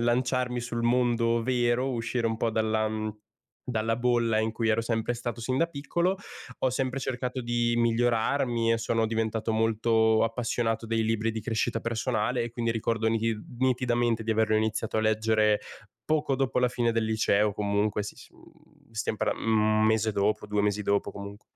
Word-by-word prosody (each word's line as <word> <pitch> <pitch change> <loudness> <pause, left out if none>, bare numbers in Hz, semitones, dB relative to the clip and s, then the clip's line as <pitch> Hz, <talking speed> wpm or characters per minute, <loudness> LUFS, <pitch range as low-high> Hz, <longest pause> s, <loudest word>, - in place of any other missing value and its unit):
lanciarmi 125 +1 0
sul 120 -1 -4
mondo 120 -1 +2
vero, 125 +1 +1
uscire 115 -1 -1
un 115 - -2
po' 115 - 0
dalla, 110 0 +1
mhmm, 110 0 -4 0.5
dalla 115 -2 -1
bolla 120 -2 +2
in 110 +1 +1
cui 115 0 -1
ero 110 +1 +3
sempre 115 0 -1
stato 120 -1 -5
sin 130 +3 -1
da 165 - +3
piccolo, 170 +4 -1 0.4
ho 130 - +2
sempre 130 +1 -2
cercato 125 0 -3
di 120 -1 0
migliorarmi 120 +1 +1
e 115 - +1
sono 115 0 0
diventato 110 0 -1
molto 110 0 +2
appassionato 115 0 -1
dei 115 0 0
libri 115 0 0
di 110 - -4
crescita 115 +1 -1
personale. 115 +1 -1
E 120 - -5
quindi 115 -1 -1
ricordo 115 0 0
ni 115 0 +1 0.4
nitidamente 120 -3 +1
di 110 - -2
averlo 110 0 +2
iniziato 110 0 -1
a - - +3
leggere 110 -1 +2 0.5
poco 150 -3 +1
dopo 130 -1 0
la 125 - +4
fine 120 -1 0
del 115 -1 0
liceo 105 -1 +2
o - - -7
comunque 105 0 0
si, 105 - -8
s - - -14
mhmm, - - -23
stiamo 110 0 -2
parlan - - 0
1 110 -1 +3
mese 110 0 +2
dopo, 105 +1 0
2 105 0 0
mesi 105 0 0
dopo 100 0 0
comunque. 100 +1 -9
115 Hz, 180 wpm, -27 LUFS, 110-120 Hz, 0.5 s, la